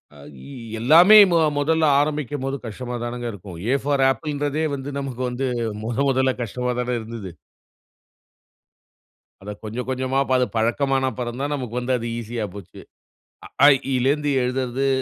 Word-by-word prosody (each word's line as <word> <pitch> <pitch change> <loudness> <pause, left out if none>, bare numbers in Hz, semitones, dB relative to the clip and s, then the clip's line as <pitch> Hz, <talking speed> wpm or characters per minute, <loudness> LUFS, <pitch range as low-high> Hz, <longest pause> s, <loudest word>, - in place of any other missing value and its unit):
அ - - -15 0.3
இ - - -12 0.3
எல்லாமே 170 - +7
மொ 170 - +4 0.2
மொதல்ல 160 +2 +1 0.2
ஆரம்பிக்கும்போது 145 -2 -2
கஷ்டமா 125 +3 -6
தானங்க 120 0 -4
இருக்கும். 95 -3 -10
ஏ - - +3
ஃபார் 140 -2 +1
ஆப்பிள்ன்றதே 145 +3 -2
வந்து, 140 +1 -6
நமக்கு 130 -2 -5
வந்து 125 +2 -3 0.4
மொத 115 +1 -3
மொதல்ல 130 0 +2
கஷ்டமா 125 +2 -3
தானே 125 0 -1
இருந்தது 110 -4 -8 2.1
அத 105 +2 -7
கொஞ்ச, 110 +2 -7
கொஞ்சமா 130 +1 -1 0.2
அது 125 - +2
பழக்கமானப்பறந்தான் 130 +2 -1
நமக்கு 125 -3 -4
வந்து 125 +1 -1
அது 115 0 -5
ஈசியா 115 -1 -4
போச்சு. 95 -3 -11 0.7
அ, - - -12 0.2
ஆ, - - +10
இ, - - -5
ஈ - - +1
லருந்து 145 +2 +1
எழுதுறது, 130 +1 -1
130 Hz, 145 wpm, -22 LUFS, 120-140 Hz, 2.1 s, ஆ